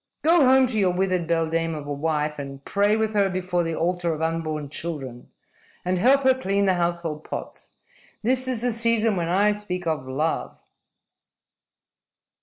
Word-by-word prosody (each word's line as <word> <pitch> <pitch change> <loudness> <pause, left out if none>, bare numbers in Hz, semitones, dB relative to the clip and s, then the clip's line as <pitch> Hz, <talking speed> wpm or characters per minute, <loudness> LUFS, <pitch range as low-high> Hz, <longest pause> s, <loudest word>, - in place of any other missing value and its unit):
"Go 330 0 +5
home 260 0 +6
to 235 -4 -2
your 190 -2 +3
withered 180 -2 0
beldame 165 0 0
of 150 -2 -7
a 145 - -3
wife 150 0 -1
and 135 -1 -8
pray 205 +2 +2
with 220 0 -1
her 200 -2 +2
before 180 -1 -1
the 165 -1 -2
altar 175 0 -1
of 155 - -7
unborn 160 -2 -2
children, 140 -6 -5 0.6
and 180 0 0
help 270 +7 +4
her 260 0 +5
clean 200 -6 0
the 190 - +3
household 170 -3 -2
pots. - - -8 0.5
This 255 +3 +2
is 245 -3 -1
the 245 - +2
season 230 -1 +2
when 170 -2 -2
I 200 +4 +3
speak 190 -4 -4
of 155 -5 -2
love!" 150 +5 -2
180 Hz, 170 wpm, -24 LUFS, 160-210 Hz, 0.6 s, home